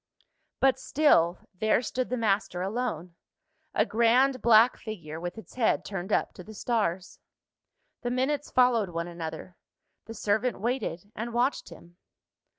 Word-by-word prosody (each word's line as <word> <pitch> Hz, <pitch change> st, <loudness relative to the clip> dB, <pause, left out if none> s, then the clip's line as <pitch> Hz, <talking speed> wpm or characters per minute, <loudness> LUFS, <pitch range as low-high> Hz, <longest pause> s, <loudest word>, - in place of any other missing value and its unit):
But 270 Hz, -1 st, +3 dB
still, 180 Hz, -, +3 dB
there 215 Hz, +5 st, +1 dB
stood 255 Hz, +3 st, -2 dB
the 250 Hz, -, -1 dB
master 200 Hz, -5 st, 0 dB
alone 195 Hz, -5 st, -3 dB, 0.6 s
a -, -, +3 dB
grand 250 Hz, +4 st, +3 dB
black 230 Hz, +1 st, +6 dB
figure, 165 Hz, -9 st, -7 dB
with 175 Hz, +4 st, -6 dB
its 220 Hz, -, -11 dB
head 245 Hz, -3 st, +1 dB
turned 195 Hz, 0 st, -5 dB
up -, -, +1 dB
to 180 Hz, -, -11 dB
the 215 Hz, +3 st, -12 dB
stars. 195 Hz, -7 st, -2 dB, 0.8 s
The 245 Hz, -, -2 dB
minutes 265 Hz, +4 st, -1 dB
followed 245 Hz, -6 st, +3 dB
one 170 Hz, 0 st, -4 dB
another: 170 Hz, +1 st, -7 dB, 0.5 s
the 225 Hz, -, -8 dB
servant 215 Hz, +3 st, 0 dB
waited, 205 Hz, -5 st, -3 dB
and 230 Hz, +2 st, -5 dB
watched 250 Hz, +4 st, 0 dB
him. 175 Hz, +1 st, -15 dB
220 Hz, 145 wpm, -28 LUFS, 180-245 Hz, 0.8 s, black